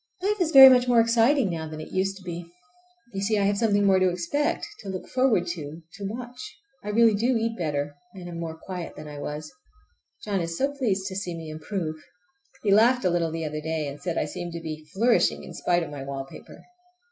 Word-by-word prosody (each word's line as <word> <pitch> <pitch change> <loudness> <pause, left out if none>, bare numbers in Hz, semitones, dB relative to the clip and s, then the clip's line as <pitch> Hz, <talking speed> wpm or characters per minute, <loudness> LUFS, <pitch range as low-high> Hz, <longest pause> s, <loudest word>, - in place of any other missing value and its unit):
Life 415 0 0
is 340 - +2
very 270 -3 +11
much 250 -1 +6
more 240 -1 +5
exciting 230 0 +3
now 160 -1 -4
than 155 0 -7
it 155 - -9
used 195 +1 -1
to 195 - -14
be. 175 -1 -6 0.7
You 195 - -3
see 210 +2 +1
I 200 - +2
have 200 0 +1
something 205 -3 +2
more 190 -1 +5
to 185 0 +4
expect, 180 +12 -1
to 200 - -8
look 185 -1 -5
forward 255 -9 +2
to, 160 -1 -6
to 200 -1 -7
watch. 245 +3 -8 0.3
I 210 - -5
really 225 +1 +5
do 235 +4 +2
eat 225 0 -1
better, 145 -5 -2 0.2
and 180 -2 -8
am 170 -1 -6
more 165 -1 -5
quiet 180 0 -7
than 150 - -9
I 145 -1 -8
was. 150 +1 -6 0.7
John 200 -3 0
is 165 0 -3
so 275 +1 +1
pleased 210 -9 -1
to 190 -1 -4
see 180 -3 -3
me 160 -1 -7
improve! 155 0 -4 0.7
He 205 - +2
laughed 235 +3 +5
a 180 - +3
little 170 -1 +1
the 165 0 -4
other 155 0 -4
day, 160 -1 -2
and 140 +1 -8
said 175 -2 -3
I - - +1
seemed 170 +3 -6
to 170 - -4
be 155 -1 -7
flourishing 230 +4 +2
in - - -9
spite 175 -1 +1
of 155 - -7
my 140 -2 -6
wallpaper. 135 0 -8
185 Hz, 230 wpm, -26 LUFS, 160-225 Hz, 0.7 s, very